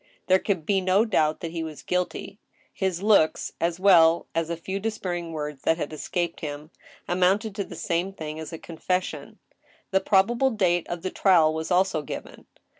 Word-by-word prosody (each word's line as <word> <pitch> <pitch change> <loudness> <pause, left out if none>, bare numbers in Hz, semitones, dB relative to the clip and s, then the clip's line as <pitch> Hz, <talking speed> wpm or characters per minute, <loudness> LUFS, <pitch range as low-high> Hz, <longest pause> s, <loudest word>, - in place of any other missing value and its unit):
There 185 0 +4
could 185 -7 -2
be 195 0 +2
no 190 +4 +3
doubt 155 -8 +1
that 165 - -4
he 165 -1 -4
was 160 -2 -7
guilty. 180 +3 -3 0.3
His 190 -1 -2
looks, 200 -7 +3
as 170 +1 0
well 170 -4 +5
as 165 0 -1
a 170 - -2
few 190 +4 -4
despairing 180 -5 -3
words 150 -3 -5
that 160 - +2
had 160 - -4
escaped 170 +2 -3
him, 150 0 -6 0.4
amounted 190 +4 +2
to 200 - 0
the - - -10
san^e 180 +3 -2
thing 155 0 -6
as 160 - -7
a 165 - -6
confession. 180 +3 -3 0.5
The 190 0 +3
probable 230 +7 +3
date 180 -7 +1
of 175 0 -5
the 185 - -2
trial 165 -5 +4
was 160 0 -4
also 185 -3 +2
given. 150 - -8
175 Hz, 185 wpm, -25 LUFS, 160-190 Hz, 0.5 s, well